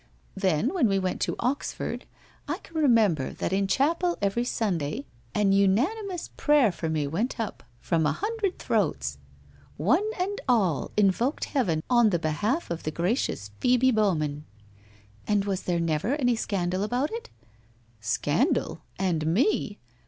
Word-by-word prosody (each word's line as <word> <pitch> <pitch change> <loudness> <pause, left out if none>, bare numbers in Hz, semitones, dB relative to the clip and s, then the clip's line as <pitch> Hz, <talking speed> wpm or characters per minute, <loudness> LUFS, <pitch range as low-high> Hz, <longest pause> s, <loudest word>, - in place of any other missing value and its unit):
Then, 195 - +1
when 335 -11 +3
we 195 - +2
went 185 -1 -2
to - - 0
Oxford, 255 +4 -3 0.4
I - - -1
can 330 - -18
remember 225 - +3
that - - -3
in 195 0 +1
chapel 335 - +1
every 200 +4 0
Sun 215 -7 0
day 145 -1 -4 0.3
an 205 -2 +3
unanimous 310 - +1
prayer 290 -8 +4
for 165 -1 -4
me 155 -2 0
went 200 - -2
up 225 - -4 0.2
from 160 +1 +1
a - - +2
hundred 420 -2 -2
throats. 70 - -1 0.6
One 310 - +2
and 395 +3 -2
all 195 - +2
invoked 210 - +2
heaven 175 - 0
on 240 -3 +5
the 175 - +1
behalf 170 - -1
of 170 - -4
gracious 170 - -1
Phoebe 250 +1 +4
Bowman 155 - 0 0.3
' 100 +1 -27
' 105 +1 -29
And 205 -2 +2
was 195 -2 -1
there 175 -1 -1
never 165 - 0
any 245 -5 +2
scandal 185 -4 -1
about 245 +7 0
it? 470 +1 -6 0.4
' 115 -1 -35
'Scandal 105 - 0
— - - -33
and 160 -3 0
me!' 205 - +1
200 Hz, 160 wpm, -27 LUFS, 165-255 Hz, 0.6 s, on